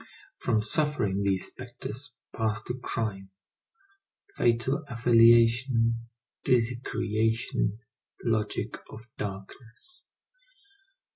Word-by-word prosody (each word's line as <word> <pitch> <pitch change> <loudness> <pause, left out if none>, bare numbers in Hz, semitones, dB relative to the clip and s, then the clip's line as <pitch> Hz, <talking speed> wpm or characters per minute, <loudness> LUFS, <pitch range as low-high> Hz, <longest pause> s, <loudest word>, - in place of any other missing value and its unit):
From 110 -3 +1
suffering 130 -10 +1
these 95 -2 +1
spectres 125 -1 -6 0.2
pass 110 -1 0
to - - -3
crime; 110 -6 -4 1.1
fatal 120 +5 +2
affiliation, 115 0 +4 0.3
dizzy 125 -2 +2
creation, 110 -2 0 0.5
logic 110 -3 -1
of 110 +1 -10
darkness. 110 - -5
115 Hz, 75 wpm, -28 LUFS, 110-125 Hz, 1.1 s, affiliation